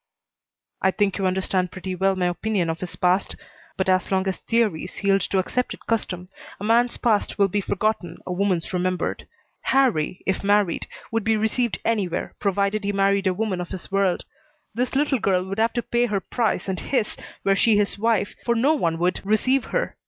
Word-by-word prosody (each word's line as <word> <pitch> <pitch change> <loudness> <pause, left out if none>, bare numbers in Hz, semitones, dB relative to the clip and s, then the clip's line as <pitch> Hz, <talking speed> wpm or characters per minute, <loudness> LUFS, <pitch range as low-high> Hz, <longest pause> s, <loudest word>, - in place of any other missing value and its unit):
"I 190 - +4
think 200 0 0
you 190 - +2
understand 185 -1 0
pretty 185 0 -5
well 190 +1 +1
my 185 -1 0
opinion 175 0 0
of 165 - -6
his 180 -1 -5
past. 180 +1 +1 0.4
But 190 - 0
as 185 -1 +2
long 190 0 +2
as 190 - -1
theories 215 -6 -1
yield 195 0 +3
to 195 - +1
accepted 245 +7 -2
custom 185 -5 -2 0.3
a - - -7
man's 235 +3 +3
past 220 -4 +1
will 200 -1 +4
be 205 +2 0
forgotten, 200 -1 -1
a 180 - -3
woman's 185 -2 0
remembered. 180 -1 -1 0.3
Harrie, 230 - +1
if 190 - -1
married, 205 -3 +2 0.2
would 225 -1 0
be 225 +1 +2
received 220 +2 0
anywhere, 200 -7 -1
provided 200 +1 0
he 200 - 0
married 195 0 +2
a 185 - +2
woman 200 -3 -1
of 175 - -6
his 190 0 -7
world. 195 -2 +1 0.5
This 250 +4 -1
little 280 -2 +2
girl 185 -3 +1
would 195 +2 -4
have 225 +1 +2
to 240 - -1
pay 240 0 +1
her 205 -3 0
price 220 -2 -1
and 190 -1 -2
his, 245 -6 -1 0.3
were 195 0 +3
she 215 +1 +4
his 205 -1 0
wife, 225 -1 +1
for 235 - +1
no 265 +7 +3
one 170 - 0
would 175 +2 0
receive 230 +6 +2
her. - - -2
200 Hz, 195 wpm, -24 LUFS, 185-225 Hz, 0.5 s, I